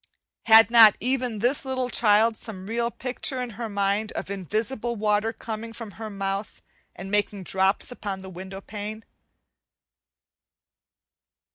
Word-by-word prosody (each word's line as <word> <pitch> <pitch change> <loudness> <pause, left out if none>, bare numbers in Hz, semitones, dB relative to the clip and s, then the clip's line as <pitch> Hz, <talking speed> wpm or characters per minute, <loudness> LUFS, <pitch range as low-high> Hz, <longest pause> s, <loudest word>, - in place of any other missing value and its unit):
Had 225 0 +8
not 225 -3 +8
even 250 -1 -1
this 245 +7 +1
little 260 -2 -2
child 220 0 +4
some 195 -4 -8
real 235 +3 -1
picture 255 +2 -2
in 250 -1 -4
her 225 +1 -5
mind 200 +1 0
of - - -5
invisible 220 - -2
water 210 +1 +1
coming 225 0 -7
from 225 -2 -8
her 220 +2 -7
mouth, 195 +1 -4 0.4
and 195 - -8
making 205 -1 0
drops 190 +5 0
upon 200 -5 -5
the 190 - -8
window 190 +2 -8
pane? 215 +2 -7
215 Hz, 135 wpm, -25 LUFS, 200-235 Hz, 0.4 s, Had